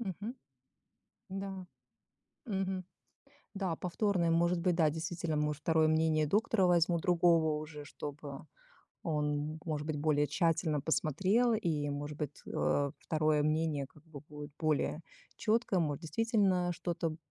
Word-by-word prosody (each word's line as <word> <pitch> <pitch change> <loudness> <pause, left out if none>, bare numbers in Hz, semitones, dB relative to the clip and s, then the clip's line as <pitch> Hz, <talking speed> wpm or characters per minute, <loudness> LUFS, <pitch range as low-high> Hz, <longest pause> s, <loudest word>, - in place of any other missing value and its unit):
Мгм. 210 +3 -4 1.0
Да. 195 -1 -5 0.8
Мгм. 190 -3 -2 0.7
Да, 190 -4 -1
повторное, 180 -1 0
может 170 +1 +3
быть, 175 0 +2
да, 160 -3 +4
действительно, 165 0 -2
может, 150 -1 -1
второе 160 -1 +3
мнение 155 -1 +2
доктора 205 +1 +2
возьму 170 -1 +3
другого 170 -3 +3
уже, 150 -1 -8
чтобы 145 -1 -7 0.6
он, 150 -1 -1
может 150 -2 -3
быть, 155 -2 -2
более 150 -1 +2
тщательно 165 -3 +1
посмотрел 190 - +2
и, 155 -9 0
может 145 +1 -4
быть, 150 -2 -5
э, 140 -1 +1
второе 155 -1 +1
мнение 155 -2 0
как 150 +2 -20
бы 155 -4 -10
будет 150 -1 -8
более 155 0 0 0.4
чёткое. 220 -3 +1
Может, 150 0 -1
действительно, 190 -1 +1
что-то, 170 -2 -3
160 Hz, 130 wpm, -33 LUFS, 150-180 Hz, 1.0 s, да